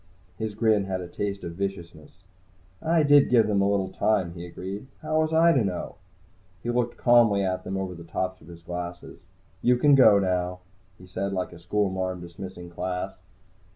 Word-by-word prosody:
His 110 -2 -3
grin 110 -3 +2
had 95 -1 -3
a 90 - -6
taste 100 +2 -4
of 85 - -5
viciousness. 90 -1 -6 0.6
"I 165 0 +2
did 145 -1 +6
give 115 -3 +5
them 105 -2 +1
a 100 - +2
little 100 -2 0
time," 95 -6 0
he 85 0 -8
agreed. 95 +7 -7 0.2
"How 155 0 +1
was 155 0 0
I 165 +1 +5
to 130 -8 +3
know?" 95 -3 -4 0.7
He 120 - -1
looked 120 0 -1
calmly 115 -5 +4
at 95 -1 -2
them 95 - -4
over 95 -1 -3
the 85 -1 -10
tops 90 +2 -3
of 75 - -16
his 85 -1 -12
glasses. 90 0 -7 0.4
"You 125 0 +4
can 145 +3 +4
go 110 -7 +7
now," 90 -1 -1 0.4
he 90 - -14
said, 95 +2 -3
like 90 -2 -3
a 85 - -12
schoolmarm 95 0 -1
dismissing 90 0 -9
class. 90 +2 -3
95 Hz, 190 wpm, -26 LUFS, 90-110 Hz, 0.7 s, go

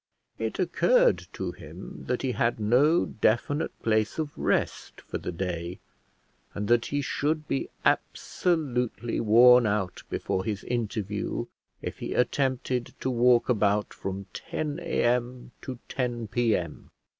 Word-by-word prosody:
It - - -2
occurred - - +3
to - - -3
him - - -10
that 125 +1 -1
he 130 - +1
had 120 -2 0
no 130 +10 +4
definite 120 +8 0
place 110 -1 +1
of 155 -2 -3
rest - - -1
for - - -6
the - - -4
day, 85 0 -4 0.8
and 105 0 -2
that 120 -1 +3
he 145 0 -1
should 150 +3 -1
be 135 - -1 0.2
absolutely 125 - 0
worn 120 +2 +7
out 100 -4 -1
before 95 - -1
his 105 0 -3
interview 105 -4 -2 0.4
if - - -5
he - - -4
attempted 130 -1 0
to 130 - -1
walk 120 0 +4
about 105 -3 +1
from 95 0 -5
10 150 -1 -4
A.M. 125 -6 0
to 130 -2 -6
10 120 -4 -2
P.M. 110 -10 -1
120 Hz, 135 wpm, -27 LUFS, 105-130 Hz, 0.8 s, worn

